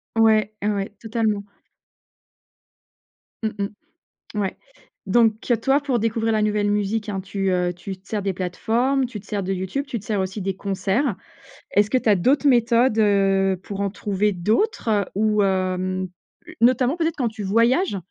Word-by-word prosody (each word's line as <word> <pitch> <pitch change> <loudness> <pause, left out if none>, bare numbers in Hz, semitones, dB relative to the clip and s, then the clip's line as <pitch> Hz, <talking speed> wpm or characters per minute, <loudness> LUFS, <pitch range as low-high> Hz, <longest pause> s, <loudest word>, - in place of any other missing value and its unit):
Ouais, 220 -1 +3
ouais, 205 -1 -1
totalement. 220 -3 -1 2.0
Mmh 220 - +1
mmh. 200 +1 -5 0.5
Ouais. 195 -2 -2 0.5
Donc 220 +2 +3 0.2
toi, 270 +3 +3
pour 270 -4 0
découvrir 225 0 0
la 215 - +2
nouvelle 210 -1 +1
musique, 210 +1 -1
hein, 195 -2 -2
tu, 195 0 -2
heu, 180 -1 +1
tu 185 +2 -7
te 190 - -28
sers 210 -2 -2
des 195 -1 -1
plateformes, 230 +9 0
tu 225 -4 -7
te 200 - -17
sers 205 0 -2
de 190 - -2
YouTube, 190 +10 -3
tu 235 -4 -3
te 205 - -15
sers 210 -2 -1
aussi 190 +2 -3
des 190 0 -2
concerts. 200 +5 -1 0.6
Est-ce 205 +1 +3
que 255 - +3
tu 230 - 0
as 205 - +6
d'autres 280 +10 +2
méthodes, 235 -1 +3
heu, 195 -2 +3
pour 200 0 -6
en 200 - 0
trouver 205 +1 -1
d'autres 215 - 0
ou 210 0 +2
hem 185 -1 -1 0.5
notamment, 255 +5 +3
peut-être, 325 -1 0
quand 250 -5 0
tu 215 -2 -7
voyages? 230 - +2
210 Hz, 165 wpm, -22 LUFS, 195-230 Hz, 2.0 s, as